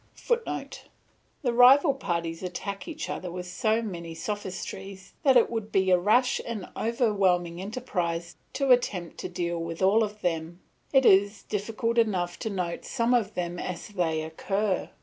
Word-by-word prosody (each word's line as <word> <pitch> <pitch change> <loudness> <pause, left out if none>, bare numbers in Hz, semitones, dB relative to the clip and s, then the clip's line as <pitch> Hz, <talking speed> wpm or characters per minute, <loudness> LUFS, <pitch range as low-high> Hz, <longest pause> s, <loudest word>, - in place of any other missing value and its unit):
[Footnote: 475 -1 -3 0.6
The 245 -3 +1
rival 270 +5 +7
parties 170 -9 -3
attack 195 - -5
each 315 -2 -5
other 180 - -4
with 180 +1 -6
so 220 +5 0
many 170 -6 -6
sophistries 190 0 -6
that 270 -4 +5
it 235 - +5
would 220 -2 -3
be 190 -1 +2
a 180 - +5
rash 220 +7 +3
and 220 -5 -5
overwhelming 195 -7 +1
enterprise 180 -6 -3 0.2
to 275 -2 +1
attempt 195 -9 +1
to - - -4
deal 170 -1 -2
with 165 +2 -4
all 200 +4 +5
of 210 0 -5
them; 165 0 -2 0.3
it 270 -2 +4
is 200 +1 +4
difficult 225 +3 -1
enough 180 -6 0
to 220 - -3
note 180 -4 -3
some 235 -1 0
of 220 -4 +1
them 175 -1 -3
as 180 +3 -5
they 165 -6 -1
occur. 195 +5 -1
195 Hz, 160 wpm, -27 LUFS, 175-230 Hz, 0.6 s, rival